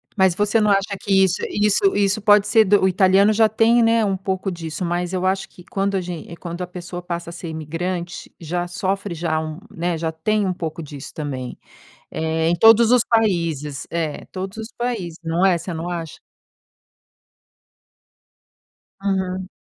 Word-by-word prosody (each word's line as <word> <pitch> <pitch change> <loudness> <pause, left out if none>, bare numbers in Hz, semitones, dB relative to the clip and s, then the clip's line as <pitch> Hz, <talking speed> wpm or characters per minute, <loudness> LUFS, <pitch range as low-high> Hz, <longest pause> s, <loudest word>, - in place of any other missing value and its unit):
Mas 190 -4 +3
você 210 +3 +2
não 210 - +3
acha 200 +1 +1
que 200 - -4
isso 190 -1 +1
isso 210 - +2
isso 205 +1 +1
pode 205 -1 +5
ser 220 +1 +5
do 205 +1 +4
o - - +5
italiano 190 +3 +4
já 220 0 +4
tem, 230 +2 +4
né, 225 -1 +3
um 195 -1 0
pouco 190 0 -2
disso, 170 0 -5
mas 175 +1 -2
eu 185 0 -1
acho 190 +1 0
que 180 - -16
quando 195 +2 -2
a - - -1
gen 175 -1 -7
quando 170 0 -6
a 180 - -3
pessoa 175 0 -7
passa 170 -1 -5
a - - -10
ser 170 - -7
imigrante, 170 +3 -4
já 175 +2 -3
sofre 190 +1 -2
já 160 -1 -1
um 155 0 -5
né, 170 0 -2
já 160 0 -2
tem 205 +6 0
um 185 - 0
pouco 165 -1 -5
disso 140 -2 -9
também, 130 -5 -5 0.5
eh, 160 0 -1
em 170 - +3
todos 225 +4 +6
os 250 -2 +5
países, 170 - 0
é, 165 -3 -3
todos 190 +2 -6
os 220 +1 -7
países, 215 -9 -3
não 165 +2 0
é? 185 -3 +4
Você 170 +1 -6
não 165 +2 -4
acha? 165 -3 -5 2.8
Uhum. 190 -1 -2
180 Hz, 180 wpm, -21 LUFS, 165-200 Hz, 2.8 s, todos